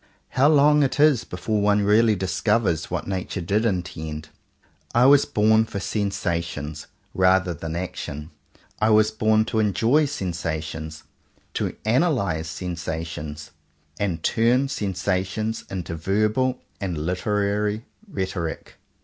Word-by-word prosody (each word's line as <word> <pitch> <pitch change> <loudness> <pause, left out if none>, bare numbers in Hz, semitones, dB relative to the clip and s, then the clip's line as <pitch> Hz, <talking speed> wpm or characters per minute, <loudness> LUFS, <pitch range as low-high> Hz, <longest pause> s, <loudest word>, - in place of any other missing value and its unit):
How 135 +3 +3
long 150 0 +5
it 140 0 0
is 150 -5 +5
before 100 +4 -2
one 105 0 +3
really 105 +2 +4
discovers 95 -2 0
what - - -3
nature 95 0 -3
did 100 +6 0
intend! 80 -6 -3 0.7
I 120 +1 +5
was 140 +1 +6
born 110 +1 +3
for 100 - -5
sensations, 85 -7 -3 0.3
rather 95 -1 +3
than 80 +1 -6
for - - -3
action. 75 -4 -6 0.5
I 110 - +3
was 110 0 +4
born 110 0 +2
to 110 - -1
enjoy 115 +8 +3
sensations, 80 - -4 0.5
to - - -2
analyze 110 - +1
sensations, 80 -2 -5 0.5
and 90 -6 -2
turn 125 +4 +2
sensations 100 +1 -2
into 90 -3 -4
verbal 110 +9 +1 0.2
and 95 -5 -3
literary 105 +5 -1 0.2
rhetoric. 95 - -4
100 Hz, 120 wpm, -24 LUFS, 85-110 Hz, 0.7 s, was